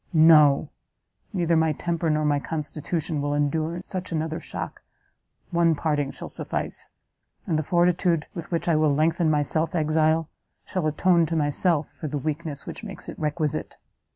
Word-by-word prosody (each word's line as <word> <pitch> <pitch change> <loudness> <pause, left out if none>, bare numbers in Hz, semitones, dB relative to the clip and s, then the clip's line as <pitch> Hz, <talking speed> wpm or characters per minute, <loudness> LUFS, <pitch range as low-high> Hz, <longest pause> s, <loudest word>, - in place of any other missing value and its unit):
No! 155 -3 +6 0.6
neither 170 -5 +1
my 160 -1 +3
temper 170 +1 -1
nor 155 0 +1
my 145 -1 +2
constitution 155 +1 -3
will 145 0 -1
endure 160 +4 -1
such 185 -2 -5
another 160 0 -2
shock, - - -6 0.7
one 170 -2 +3
parting 145 -2 0
shall - - -7
suffice, - - -4 0.6
and 160 - 0
the 155 - +2
fortitude 175 0 +2
with 170 -3 -7
which 170 -1 -2
I 170 - +3
will 155 -2 +3
lengthen 160 +2 +2
my 150 -1 +2
self 160 +3 -1
exile, 155 0 +2 0.4
shall 180 -4 -1
atone 170 +2 +3
to 165 - -2
myself 150 +1 +2
for 155 - -7
the 145 - -3
weakness 150 0 -4
which - - -8
makes - - -5
it - - -8
requisite!" 155 0 -2
160 Hz, 160 wpm, -25 LUFS, 150-170 Hz, 0.7 s, No